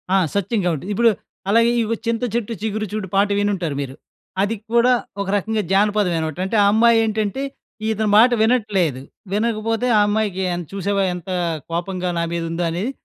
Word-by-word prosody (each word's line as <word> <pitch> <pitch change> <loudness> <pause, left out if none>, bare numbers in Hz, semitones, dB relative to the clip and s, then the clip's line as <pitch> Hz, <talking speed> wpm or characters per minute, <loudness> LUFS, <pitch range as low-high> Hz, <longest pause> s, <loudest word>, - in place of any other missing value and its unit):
ఆ! - - +6 0.2
సత్యం 205 +3 0
గాబట్టి. 170 0 -1
ఇప్పుడు 230 +3 +4 0.4
అలాగే, 230 +2 +4
ఇవొ 225 +1 -1
'చింత 230 +1 -1
చెట్టు 235 -1 -1
చిగురు 215 0 -2
చూడు' 210 -4 -4
పాట 200 +1 +4
వినుంటారు 190 -7 -1
మీరు. 135 -1 -6 0.5
అది 205 +3 0 0.2
కూడా 235 +1 +5 0.3
ఒక 200 - -3
రకంగా 220 +2 -1
జానపదమేనమాట. 195 -6 +1
అంటే, 215 +4 0
ఆ - - +4
అమ్మాయేంటంటే, 225 +1 +2 0.5
ఇతని 220 -1 0
మాట 240 +3 +7
వినట్లేదు, 205 - +1 0.3
వినకపోతే, 225 +2 0
"ఆ - - +5
అమ్మాయికి 205 -3 0
ఎన్ 175 0 -3
చూశావా, 200 0 0
ఎంతా 180 +1 -5 0.4
కోపంగా, 180 +1 -2
నా 170 - +1
మీదుందో" 165 0 -2
అనేది 190 +10 -2
205 Hz, 155 wpm, -21 LUFS, 180-225 Hz, 0.5 s, మాట